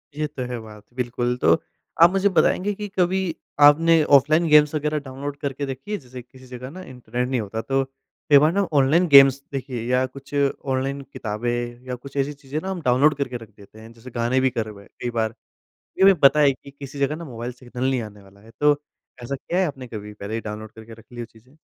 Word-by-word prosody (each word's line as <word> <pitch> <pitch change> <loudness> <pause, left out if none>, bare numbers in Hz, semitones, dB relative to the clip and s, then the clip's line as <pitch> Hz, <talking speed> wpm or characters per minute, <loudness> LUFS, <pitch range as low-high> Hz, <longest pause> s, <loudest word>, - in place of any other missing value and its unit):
ये 150 0 -1
तो 140 -3 -6
है 120 - -3
बात, 105 -1 -13
बिल्कुल। 125 0 -2
तो 85 - +5 0.5
आप 170 - +9
मुझे 195 +1 +2
बताएँगे 190 +5 +2
कि 205 +1 -6
कभी 180 +2 +2 0.5
आपने 165 +2 +5 0.2
ऑफलाइन 155 +5 +2
गेम्स 150 0 +6
वग़ैरह 150 0 -1
डाउनलोड 140 +1 -7
करके 140 -1 -4
रखी 135 +10 -9
हैं? 210 - -1
जैसे 125 -1 -10
किसी 130 +2 -17
जगह 125 0 -8
ना 185 +6 -10
इंटरनेट 125 -5 -4
नहीं 130 -3 0
होता 110 +2 -4
तो 135 +1 0 0.5
कई 145 - +8
बार 155 +3 +4
ना 200 - +2
ऑनलाइन 150 +6 +4
गेम्स 135 -2 +7
देखिए 130 -3 -4
या 130 +1 +3
कुछ 140 +2 -12
ऑनलाइन 140 -1 -1
किताबें 110 +2 -3 0.4
या 125 - -3
कुछ 135 +3 -11
ऐसी 140 +1 0
चीज़ें 140 +1 -6
ना 190 - -5
हम 185 -2 -5
डाउनलोड 140 +3 +3
करके 130 -4 -3
रख 115 -2 -13
देते 105 +1 -16
हैं। 110 +1 -12
जैसे 115 +2 -13
गाने 120 +2 0
भी 130 - +3
कर 115 -2 -3
हुए 100 -2 -11
हैं - - -21
कई 120 - -2
बार, 110 -1 -1 0.6
ये - - +3
हमे 195 0 +8
पता 140 +2 +7
है 145 -2 +5
कि 140 +1 -15
किसी 140 0 -10
जगह 140 +2 +1
ना 170 +1 -8
मोबाइल 120 -3 -6
सिग्नल 125 +1 -4
नहीं 130 -2 0
आने 105 -2 -10
वाला 100 +1 -19
है। 110 +2 -17
तो 145 0 +4 0.4
ऐसा 140 +3 -3
किया 175 +6 -3
है 190 - +3
आपने 135 -4 -7
कभी 105 -2 -8
पहले 105 +1 -7
ही 115 - -2
डाउनलोड 110 0 -7
करके 110 +1 -13
रख 115 0 -15
ली 120 - -10
हो 120 - -4
चीज़ें? 115 +5 -22
130 Hz, 230 wpm, -23 LUFS, 120-145 Hz, 0.6 s, आप